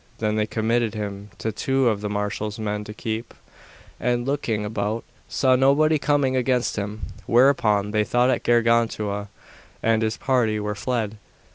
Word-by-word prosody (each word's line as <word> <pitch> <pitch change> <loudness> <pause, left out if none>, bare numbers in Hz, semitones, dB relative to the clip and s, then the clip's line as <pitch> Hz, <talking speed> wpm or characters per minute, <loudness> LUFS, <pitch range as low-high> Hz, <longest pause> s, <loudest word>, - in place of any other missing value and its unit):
Then 105 -1 0
they 105 0 +1
committed 115 0 0
him 100 -1 -5
to 110 - -2
two 135 +4 +1
of 105 -3 +1
the 105 - -3
marshal's 105 +1 -3
men 105 -1 -3
to 105 - -8
keep, 115 0 -4 0.6
and, 120 -1 0
looking 120 -7 -1
about, 105 +1 -2 0.3
saw 130 -1 +3
nobody 145 +4 +4
coming 140 -2 +1
against 125 -1 +1
them, 105 +1 -4 0.3
whereupon 115 -5 +3
they 105 0 +2
thought 120 +3 +2
that 130 - +1
Gargantua 115 -3 +1 0.6
and 115 0 +3
his 110 0 -1
party 120 -5 +1
were 105 0 -2
fled. 110 -1 -2
110 Hz, 155 wpm, -23 LUFS, 105-125 Hz, 0.6 s, nobody